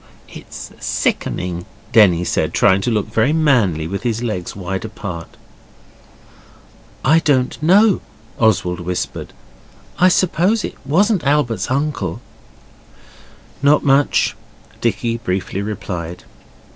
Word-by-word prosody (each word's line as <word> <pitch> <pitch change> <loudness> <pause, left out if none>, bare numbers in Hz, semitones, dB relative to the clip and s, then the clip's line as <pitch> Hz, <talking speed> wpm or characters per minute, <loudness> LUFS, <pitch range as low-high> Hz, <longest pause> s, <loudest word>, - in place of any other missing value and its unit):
'It's - - -10
sickening,' 90 -1 -2 0.3
Denny 90 -6 +5
said, - - -1
trying 95 +1 +4
to 120 - -1
look 110 -3 0
very 110 +6 +1
manly 120 - +2
with 100 +4 -4
his 115 -1 -2
legs 105 -7 -4
wide 95 -1 -4
apart. 95 -6 -7 1.7
'I 155 +4 +5
don't 135 -6 0
know,' 195 +5 +4 0.4
Oswald 95 -6 +2
whispered. 90 +1 -4 0.7
'I 180 - +6
suppose 185 +4 +2
it - - -4
wasn't 195 - +2
Albert's 140 -6 +1
uncle?' 130 - -2 1.4
'Not 145 +2 +4
much,' 140 +1 +3 0.5
Dicky 115 0 0
briefly 95 -2 -3
replied. 90 -5 -5
115 Hz, 105 wpm, -18 LUFS, 95-150 Hz, 1.7 s, I